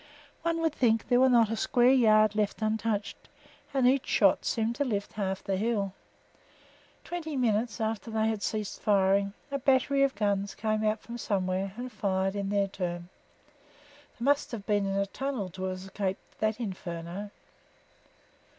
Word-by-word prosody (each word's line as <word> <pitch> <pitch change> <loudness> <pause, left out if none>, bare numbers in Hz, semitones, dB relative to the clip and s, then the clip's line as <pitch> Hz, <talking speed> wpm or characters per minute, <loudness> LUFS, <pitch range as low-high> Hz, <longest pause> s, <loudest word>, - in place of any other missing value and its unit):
One 330 0 0
would 325 -2 +1
think 225 -6 +2
there 245 - +5
was 260 0 +6
not 230 -3 +4
a - - 0
square 245 +3 +3
yard 215 -5 +5
left 210 +1 -1
untouched, 215 -1 -2 0.4
and 265 -3 +3
each 265 +1 +2
shot - - +3
seemed 225 0 0
to 285 - +2
lift 205 -6 -2
half 190 -2 -3
the 195 -1 -1
hill. 205 -2 -1 1.1
Twenty 320 -4 -4
minutes 225 -2 0
after 220 +1 -2
they 220 0 +1
had 220 -2 -1
ceased 210 -1 -3
firing, 200 -1 +3 0.2
a 280 - -1
battery 275 +1 +3
of 275 -1 +2
guns 200 -1 0
came 215 0 -1
out 215 0 +1
from 240 0 -8
somewhere 190 -2 -1
and 250 +1 -5
fired 195 -2 -1
in 200 -1 -2
their 200 -1 +1
turn. 175 -2 -4 1.1
They 235 - -4
must 285 +1 +2
have 210 -4 -5
been 205 -2 +1
in 195 - -1
a 200 - +2
tunnel 250 -2 -3
to 185 +2 -6
have 185 0 -3
escaped 190 0 -5
that 215 +1 0
inferno. 185 -2 -5
215 Hz, 170 wpm, -29 LUFS, 195-240 Hz, 1.1 s, was